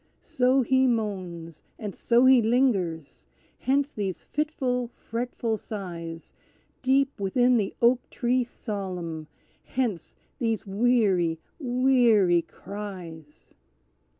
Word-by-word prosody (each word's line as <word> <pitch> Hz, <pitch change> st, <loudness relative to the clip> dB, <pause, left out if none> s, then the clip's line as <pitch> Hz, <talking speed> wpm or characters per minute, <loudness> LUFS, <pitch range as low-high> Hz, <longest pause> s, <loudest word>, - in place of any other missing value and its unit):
So 255 Hz, +1 st, +2 dB
he 260 Hz, +1 st, +3 dB
moans, 185 Hz, -, -3 dB, 0.2 s
and 205 Hz, -3 st, -5 dB
so 240 Hz, +2 st, +3 dB
he 260 Hz, -2 st, +7 dB
lingers! 210 Hz, -, 0 dB, 0.3 s
Hence 280 Hz, +2 st, +1 dB
these 195 Hz, -4 st, -3 dB
fitful, 265 Hz, -5 st, -1 dB
fretful 230 Hz, -1 st, -3 dB
sighs, 170 Hz, -6 st, -7 dB, 0.5 s
Deep 270 Hz, 0 st, +2 dB
within 245 Hz, +6 st, +3 dB
the 205 Hz, -3 st, -1 dB
oak 245 Hz, +1 st, +3 dB
tree 250 Hz, +1 st, +1 dB
solemn! 185 Hz, -9 st, -5 dB, 0.4 s
Hence 225 Hz, -11 st, -3 dB, 0.2 s
these 225 Hz, -4 st, -1 dB
weary, 195 Hz, -6 st, +2 dB, 0.2 s
weary 245 Hz, -, +4 dB
cries! 175 Hz, -7 st, -9 dB
225 Hz, 95 wpm, -26 LUFS, 185-250 Hz, 0.5 s, he